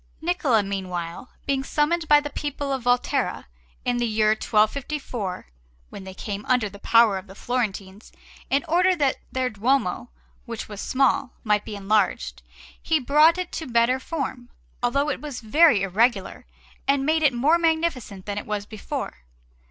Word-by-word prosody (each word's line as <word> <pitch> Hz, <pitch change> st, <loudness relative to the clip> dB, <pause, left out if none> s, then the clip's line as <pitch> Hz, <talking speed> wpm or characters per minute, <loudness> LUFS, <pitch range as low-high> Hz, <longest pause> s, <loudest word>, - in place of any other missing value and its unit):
Niccola, 315 Hz, -, +1 dB
meanwhile, 185 Hz, 0 st, -5 dB, 0.2 s
being 270 Hz, -1 st, 0 dB
summoned 315 Hz, +4 st, 0 dB
by 295 Hz, 0 st, +7 dB
the 290 Hz, 0 st, -6 dB
people 285 Hz, -1 st, -3 dB
of 265 Hz, -, -2 dB
Volterra, 245 Hz, 0 st, 0 dB, 0.4 s
in 245 Hz, -1 st, +1 dB
the 240 Hz, 0 st, 0 dB
year 215 Hz, -1 st, +2 dB
1254 220 Hz, -1 st, -1 dB, 0.5 s
(when 190 Hz, -, -9 dB
they 190 Hz, 0 st, -9 dB
came 205 Hz, +1 st, -5 dB
under 250 Hz, -4 st, +2 dB
the 200 Hz, 0 st, -12 dB
power 230 Hz, -3 st, +4 dB
of 190 Hz, -, -14 dB
the 195 Hz, -, -12 dB
Florentines), 210 Hz, -4 st, -3 dB, 0.4 s
in 275 Hz, +1 st, +1 dB
order 360 Hz, +3 st, +3 dB
that 280 Hz, -5 st, +1 dB
their 255 Hz, -1 st, -1 dB
Duomo, 225 Hz, -2 st, 0 dB, 0.4 s
which -, -, -5 dB
was 205 Hz, -1 st, -7 dB
small, 265 Hz, 0 st, +1 dB
might 210 Hz, -2 st, +2 dB
be 215 Hz, -, -6 dB
enlarged, 195 Hz, -, 0 dB, 0.4 s
he 320 Hz, -1 st, +1 dB
brought 300 Hz, +6 st, +5 dB
it 365 Hz, -1 st, -4 dB
to 320 Hz, -, -5 dB
better 235 Hz, +2 st, +2 dB
form, 260 Hz, -4 st, -5 dB, 0.3 s
although 280 Hz, +5 st, +1 dB
it -, -, -4 dB
was 290 Hz, -4 st, -6 dB
very 245 Hz, -, +4 dB
irregular, 195 Hz, -, 0 dB, 0.4 s
and 275 Hz, 0 st, +2 dB
made 315 Hz, +1 st, +2 dB
it 295 Hz, -3 st, +5 dB
more 285 Hz, +8 st, +3 dB
magnificent 320 Hz, -, -1 dB
than 205 Hz, 0 st, -3 dB
it -, -, -10 dB
was 210 Hz, -1 st, -3 dB
before. 215 Hz, -1 st, -6 dB
245 Hz, 160 wpm, -24 LUFS, 210-290 Hz, 0.5 s, by